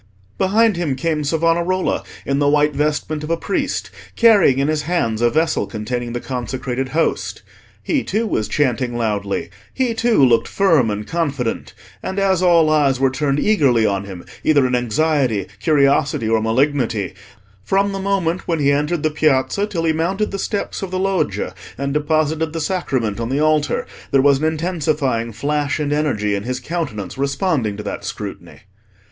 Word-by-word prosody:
Behind 210 Hz, +1 st, +3 dB
him 160 Hz, -6 st, -1 dB
came 155 Hz, +1 st, -1 dB
Savonarola 170 Hz, +4 st, +1 dB, 0.2 s
in 140 Hz, 0 st, 0 dB
the 145 Hz, 0 st, +3 dB
white 150 Hz, 0 st, +3 dB
vestment 150 Hz, +1 st, -1 dB
of 150 Hz, -, -5 dB
a 165 Hz, -, +1 dB
priest, -, -, -2 dB, 0.2 s
carrying 205 Hz, -, +5 dB
in 140 Hz, +1 st, +1 dB
his 155 Hz, -1 st, 0 dB
hands 145 Hz, -9 st, -1 dB
a 120 Hz, -, +4 dB
vessel 160 Hz, +5 st, 0 dB
containing 120 Hz, +2 st, -4 dB
the 120 Hz, -, -2 dB
consecrated 125 Hz, +1 st, -4 dB
Host. 160 Hz, +4 st, -1 dB, 0.4 s
He, 285 Hz, -5 st, 0 dB
too, 220 Hz, +4 st, -1 dB
was 110 Hz, -, -1 dB
chanting 125 Hz, -1 st, 0 dB
loudly; 105 Hz, -4 st, -2 dB, 0.2 s
he, 255 Hz, -3 st, 0 dB
too, 225 Hz, -, +3 dB
looked 115 Hz, -2 st, +3 dB
firm 165 Hz, -, +3 dB
and 105 Hz, 0 st, -3 dB
confident, 140 Hz, -6 st, -2 dB, 0.3 s
and 190 Hz, -, -5 dB
as 190 Hz, -2 st, +2 dB
all 170 Hz, -3 st, +5 dB
eyes 140 Hz, -4 st, +2 dB
were 135 Hz, -1 st, +3 dB
turned 140 Hz, +1 st, 0 dB
eagerly 135 Hz, -, +3 dB
on 100 Hz, -1 st, 0 dB
him, 95 Hz, -3 st, -9 dB, 0.2 s
either 145 Hz, -4 st, +4 dB
in 125 Hz, -, -1 dB
anxiety, 125 Hz, -, +1 dB
curiosity, 140 Hz, -2 st, +2 dB
or 110 Hz, 0 st, +2 dB
malignity, 115 Hz, -3 st, 0 dB, 0.5 s
from 195 Hz, -, +1 dB
the 195 Hz, -, -4 dB
moment 190 Hz, -3 st, -1 dB
when 165 Hz, -, +1 dB
he 140 Hz, -2 st, +2 dB
entered 150 Hz, +3 st, 0 dB
the 155 Hz, -, +1 dB
Piazza 155 Hz, +6 st, +1 dB
till 170 Hz, -5 st, -3 dB
he 160 Hz, -1 st, +2 dB
mounted 190 Hz, +6 st, -1 dB
the 195 Hz, -, -4 dB
steps 205 Hz, 0 st, -3 dB
of 195 Hz, -, -4 dB
the 185 Hz, -, -3 dB
Loggia 190 Hz, 0 st, -1 dB, 0.2 s
and 140 Hz, +1 st, -2 dB
deposited 155 Hz, +1 st, 0 dB
the 165 Hz, -, -3 dB
Sacrament 135 Hz, -, -1 dB
on 115 Hz, 0 st, -3 dB
the 135 Hz, +2 st, 0 dB
altar, 155 Hz, -1 st, +1 dB, 0.2 s
there 135 Hz, -2 st, +3 dB
was 140 Hz, -1 st, +4 dB
an 155 Hz, -, -1 dB
intensifying 155 Hz, -7 st, -1 dB
flash 145 Hz, +6 st, -1 dB
and 145 Hz, -1 st, -1 dB
energy 120 Hz, -9 st, 0 dB
in 100 Hz, -, -1 dB
his 125 Hz, +4 st, -3 dB
countenance 130 Hz, -, -4 dB
responding 140 Hz, -, 0 dB
to 105 Hz, -, -6 dB
that -, -, -5 dB
scrutiny. -, -, -7 dB
145 Hz, 175 wpm, -19 LUFS, 125-165 Hz, 0.5 s, carrying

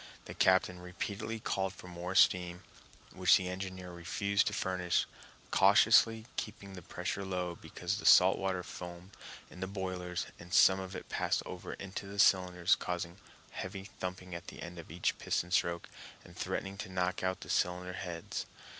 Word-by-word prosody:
The -, -, -7 dB
captain 95 Hz, -1 st, +3 dB
repeatedly 100 Hz, +5 st, -4 dB
called 95 Hz, -2 st, -1 dB
for 90 Hz, -, -12 dB
more 90 Hz, +1 st, -5 dB
steam, 90 Hz, -2 st, +4 dB, 0.5 s
which -, -, +6 dB
the 90 Hz, -, -3 dB
engineer 95 Hz, -1 st, -5 dB
refused 100 Hz, +4 st, 0 dB
to -, -, +1 dB
furnish, 90 Hz, -3 st, 0 dB, 0.5 s
cautiously 110 Hz, +3 st, +5 dB
keeping 100 Hz, -2 st, -5 dB
the 90 Hz, -, -8 dB
pressure 90 Hz, +4 st, -4 dB
low 90 Hz, -2 st, -2 dB
because 90 Hz, +3 st, -4 dB
the -, -, -8 dB
salt 95 Hz, +1 st, +7 dB
water 95 Hz, -2 st, -1 dB
foamed 90 Hz, +2 st, -9 dB, 0.4 s
in -, -, -11 dB
the 95 Hz, -, -2 dB
boilers 90 Hz, -2 st, -3 dB
and 85 Hz, +1 st, -12 dB
some 95 Hz, 0 st, +7 dB
of 95 Hz, -1 st, -6 dB
it -, -, -7 dB
passed -, -, 0 dB
over -, -, -6 dB
into 100 Hz, 0 st, -6 dB
the 100 Hz, +1 st, -8 dB
cylinders, 90 Hz, -2 st, +4 dB
causing 90 Hz, +1 st, -3 dB, 0.3 s
heavy 95 Hz, +1 st, -5 dB, 0.2 s
thumping 90 Hz, 0 st, -5 dB
at 85 Hz, -, -7 dB
the -, -, -8 dB
end 90 Hz, 0 st, -8 dB
of 85 Hz, -, -10 dB
each 85 Hz, +3 st, -1 dB
piston 90 Hz, -, -1 dB
stroke, 85 Hz, -2 st, +1 dB, 0.4 s
and -, -, -14 dB
threatening 100 Hz, 0 st, -3 dB
to 100 Hz, -, -5 dB
knock 90 Hz, 0 st, -1 dB
out 95 Hz, 0 st, -1 dB
the -, -, -9 dB
cylinder 90 Hz, +1 st, 0 dB
heads. 90 Hz, -3 st, -5 dB
90 Hz, 170 wpm, -33 LUFS, 90-95 Hz, 0.5 s, salt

